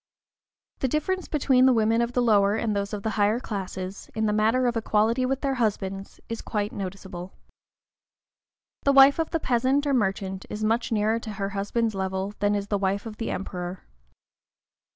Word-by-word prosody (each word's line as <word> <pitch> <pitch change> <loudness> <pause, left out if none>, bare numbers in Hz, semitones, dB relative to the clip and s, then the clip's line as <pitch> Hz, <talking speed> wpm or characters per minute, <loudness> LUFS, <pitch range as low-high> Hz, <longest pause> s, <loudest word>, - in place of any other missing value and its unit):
The 265 - +1
difference 350 +7 -1
between 260 -3 +3
the 260 - +5
women 225 0 +2
of 235 +1 -1
the 245 - +2
lower 205 -3 +4
and 220 -2 -1
those 200 0 -2
of 205 -2 -5
the 220 - -1
higher 210 +3 +3
classes, 190 -3 -6
in 220 0 0
the 210 - +1
matter 220 +4 +2
of 240 -1 +1
equality 225 +3 +1
with 270 +1 -1
their 275 -1 0
husbands, 195 -5 -2
is 230 - -5
quite 210 -1 -2
noticeable. 190 -1 -7 1.5
The 280 - +3
wife 275 +2 +7
of 325 - 0
the 330 - -1
peasant 260 +2 +1
or 285 - +1
merchant 195 -4 -1
is 210 +1 -4
much 225 +3 0
nearer 220 +1 +1
to 220 -2 -7
her 195 0 -3
husband's 210 +3 -1
level 190 +1 -2
than 205 0 +2
is 200 -1 -2
the 205 - 0
wife 195 +2 -1
of 215 -2 -7
the 225 - -3
Emperor. 180 -1 -5
215 Hz, 185 wpm, -26 LUFS, 200-245 Hz, 1.5 s, wife